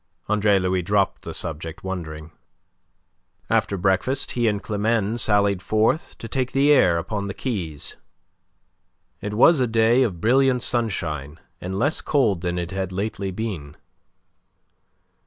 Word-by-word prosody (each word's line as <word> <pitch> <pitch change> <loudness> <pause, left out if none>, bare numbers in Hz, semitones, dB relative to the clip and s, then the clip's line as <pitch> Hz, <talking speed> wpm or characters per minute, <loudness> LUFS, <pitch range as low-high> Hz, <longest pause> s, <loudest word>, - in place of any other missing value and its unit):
Andre 105 -1 +3
Louis 90 0 0
dropped 100 +2 0
the - - -7
subject, 80 0 -5
wondering. 80 -4 -6 1.2
After 100 - +1
breakfast 95 +9 0
he 120 -1 0
and 105 -2 +1
Climene 110 +1 0
sallied 100 -3 +3
forth 110 +10 0
to 115 - -8
take 130 +2 -2
the 140 +2 +4
air 90 -12 +5
upon 100 +4 -3
the 100 - -5
quays. 90 - -4 1.2
It 105 0 -4
was 150 +7 +6
a 125 - +2
day 115 +2 +3
of 100 -10 0
brilliant 125 +4 +3
sunshine 80 - -2 0.2
and 95 +2 -4
less 145 +9 0
cold 110 - +1
than 90 0 -2
it 85 +1 -4
had 95 -1 -3
lately 100 +1 -3
been. 90 -8 -5
100 Hz, 140 wpm, -23 LUFS, 90-115 Hz, 1.2 s, was